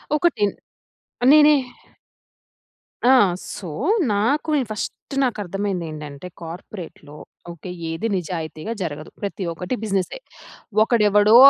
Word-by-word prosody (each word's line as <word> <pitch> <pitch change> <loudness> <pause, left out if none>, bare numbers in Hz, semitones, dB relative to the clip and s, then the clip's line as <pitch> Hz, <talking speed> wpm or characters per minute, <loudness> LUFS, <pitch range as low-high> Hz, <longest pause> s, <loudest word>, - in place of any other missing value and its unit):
ఒకటిన్ 295 - +2 0.8
నేనే 300 0 +8 1.5
ఆ! 255 - +7 0.4
సో, 190 - -7 0.5
నాకు 235 +10 +1
నేను 265 -5 +1
ఫస్ట్ 215 +6 -5
నాకు 245 -4 0
అర్థమైంది 195 -1 -2
ఏంటంటే, 150 +1 -7
కార్పొరేట్‌లో 165 -3 -9 0.3
ఓకె. 170 +2 -8 0.2
ఏది 165 +8 -2
నిజాయితీగా 165 +3 -4
జరగదు. 155 -3 -4
ప్రతి 200 -1 -3
ఒక్కటి 180 +8 -3
బిజినెసే. 195 - -1 0.6
ఒకడెవడో, 210 -1 +5
200 Hz, 100 wpm, -22 LUFS, 170-225 Hz, 1.5 s, నేనే